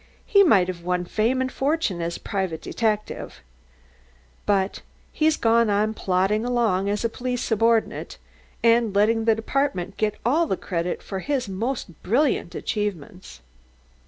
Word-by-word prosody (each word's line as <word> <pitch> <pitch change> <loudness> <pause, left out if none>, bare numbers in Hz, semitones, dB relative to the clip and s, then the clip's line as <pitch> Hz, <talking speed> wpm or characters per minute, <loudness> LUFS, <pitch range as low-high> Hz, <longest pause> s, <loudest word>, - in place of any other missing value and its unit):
He 400 - +5
might 210 - +5
have 180 -2 -5
won 180 +1 -1
fame 230 +8 0
and 260 0 -1
fortune 275 - -1
as 170 0 -3
a - - -19
private 190 -6 -2
detective. 215 - -2 1.1
But 195 -1 +1 0.3
he's 310 0 +2
gone 230 -1 +3
on 210 +2 +1
plodding 195 +2 +1
along 230 -6 +1
as 205 +3 -1
a - - +4
police 250 +1 -3
subordinate, 225 0 +1 0.5
and 230 -3 +3
letting 220 +2 +3
the 225 -1 +4
department 220 -5 -2
get 215 -1 0
all 315 +7 +3
the 190 - -1
credit 175 -1 -3
for 195 - -5
his 265 +2 -2
most 200 - -4
brilliant 235 - +1
achievements. 190 - -4
215 Hz, 145 wpm, -24 LUFS, 190-240 Hz, 1.1 s, He